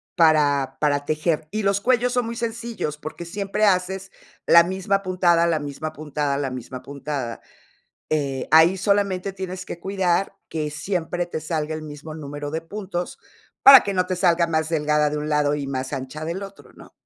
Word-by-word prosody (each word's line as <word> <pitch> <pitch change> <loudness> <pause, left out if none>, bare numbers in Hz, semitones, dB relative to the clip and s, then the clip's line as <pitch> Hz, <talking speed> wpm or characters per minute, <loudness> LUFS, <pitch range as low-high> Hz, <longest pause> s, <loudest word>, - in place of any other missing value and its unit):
para 145 -5 +3
para 145 -1 +1
tejer. 155 0 -1
Y 215 - -1
los 200 0 +2
cuellos 245 0 +2
son 245 -2 +1
muy 230 +1 -4
sencillos, 230 -9 -4
porque 155 +3 -7
siempre 200 +4 -1
haces 190 0 0 0.4
la 170 0 +8
misma 190 +2 -1
puntada, 175 -2 +3
la 160 -2 +1
misma 150 +2 -5
puntada, 150 -2 -2
la 140 -2 -1
misma 130 0 -7
puntada. 140 -3 -5 0.7
Eh, 140 -4 -1
ahí 160 +4 +6
solamente 195 -1 0
tienes 185 -1 -6
que 170 - -7
cuidar 190 -1 0
que 155 -2 -3
siempre 175 +2 -2
te 165 -2 -5
salga 155 -1 -2
el 155 - -6
mismo 150 +1 -9
número 145 -1 -6
de 160 +2 -2
puntos 180 0 -5 0.4
para 275 0 +10
que 200 -1 -2
no 180 0 +1
te 185 -1 -2
salga 170 -2 +3
más 160 -1 0
delgada 150 -2 +2
de 150 - -2
un 150 - -4
lado, 150 -1 +2
y 140 -2 -3
más 130 -1 -4
ancha 135 +4 -5
del 170 +5 -4
otro, 195 0 -11
¿no? - - -15
165 Hz, 185 wpm, -23 LUFS, 150-190 Hz, 0.7 s, para